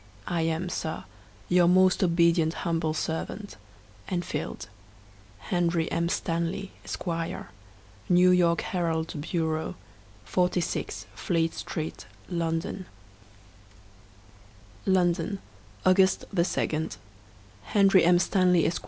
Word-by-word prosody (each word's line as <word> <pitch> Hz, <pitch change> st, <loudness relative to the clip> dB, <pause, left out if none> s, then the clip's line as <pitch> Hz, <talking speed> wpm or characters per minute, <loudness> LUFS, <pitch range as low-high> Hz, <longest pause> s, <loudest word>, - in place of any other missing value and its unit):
I 170 Hz, -2 st, -1 dB
am, 165 Hz, +2 st, -1 dB
Sir, 160 Hz, -2 st, -3 dB, 0.4 s
Your 175 Hz, -1 st, +4 dB
most 185 Hz, +1 st, +4 dB
obedient 170 Hz, -2 st, +3 dB
humble 165 Hz, -2 st, 0 dB
servant, 190 Hz, +6 st, -4 dB, 0.5 s
ENFIELD. 175 Hz, -, -3 dB, 0.7 s
Henry 170 Hz, -, 0 dB
M. 170 Hz, +1 st, 0 dB
Stanley, 170 Hz, +3 st, -2 dB
Esq., -, -, -5 dB, 1.1 s
'New 180 Hz, +1 st, +6 dB
York 170 Hz, -2 st, +3 dB
Herald 165 Hz, -3 st, -1 dB
Bureau,' 160 Hz, +1 st, -2 dB, 0.5 s
46, 180 Hz, +1 st, -1 dB
Fleet 165 Hz, -4 st, 0 dB
Street, 160 Hz, -1 st, -5 dB, 0.2 s
London, 170 Hz, +1 st, -2 dB, 2.0 s
ooo -, -, +4 dB
London, 175 Hz, +1 st, +1 dB, 0.5 s
August 190 Hz, 0 st, +4 dB
2. 160 Hz, -3 st, 0 dB, 0.7 s
Henry 195 Hz, -, +4 dB
M. 175 Hz, +1 st, +6 dB
Stanley, 180 Hz, -2 st, +3 dB
Esq. 170 Hz, -, 0 dB
170 Hz, 90 wpm, -27 LUFS, 165-180 Hz, 2.0 s, New